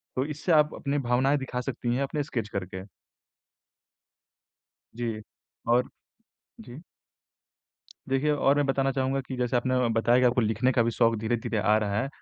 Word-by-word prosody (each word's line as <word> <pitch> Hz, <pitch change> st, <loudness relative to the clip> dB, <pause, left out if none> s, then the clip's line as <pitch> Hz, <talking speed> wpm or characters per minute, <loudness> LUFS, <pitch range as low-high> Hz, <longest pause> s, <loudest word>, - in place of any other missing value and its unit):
तो 130 Hz, -, 0 dB
इससे 155 Hz, +4 st, -3 dB
आप 150 Hz, -1 st, +4 dB
अपनी 140 Hz, 0 st, -2 dB
भावनाएँ 135 Hz, +4 st, +3 dB
दिखा 125 Hz, -2 st, -4 dB
सकती 120 Hz, -1 st, -3 dB
हैं 135 Hz, -, 0 dB
अपने 145 Hz, +1 st, -2 dB
स्केच 115 Hz, -6 st, -4 dB
करके। 95 Hz, -1 st, -5 dB, 2.1 s
जी, 115 Hz, -3 st, -3 dB, 0.5 s
और 125 Hz, +1 st, +3 dB, 0.7 s
जी। 145 Hz, -, -11 dB, 1.3 s
देखिए 135 Hz, +3 st, +1 dB
और 145 Hz, -1 st, +2 dB
मैं 145 Hz, -, +2 dB
बताना 135 Hz, 0 st, +1 dB
चाहूँगा 135 Hz, +1 st, 0 dB
कि 130 Hz, 0 st, -7 dB
जैसे 125 Hz, 0 st, 0 dB
आपने 130 Hz, +1 st, 0 dB, 0.2 s
बताया 120 Hz, +2 st, +3 dB
कि 125 Hz, -, +2 dB
आपको 125 Hz, +1 st, +2 dB
लिखने 115 Hz, +3 st, +1 dB
का 120 Hz, -, +3 dB
भी 115 Hz, -, 0 dB
शौक 115 Hz, 0 st, +2 dB
धीरे-धीरे 110 Hz, 0 st, -2 dB
आ 105 Hz, +1 st, +3 dB
रहा 105 Hz, -1 st, -1 dB
है 135 Hz, -, -2 dB
125 Hz, 160 wpm, -27 LUFS, 115-135 Hz, 2.1 s, आप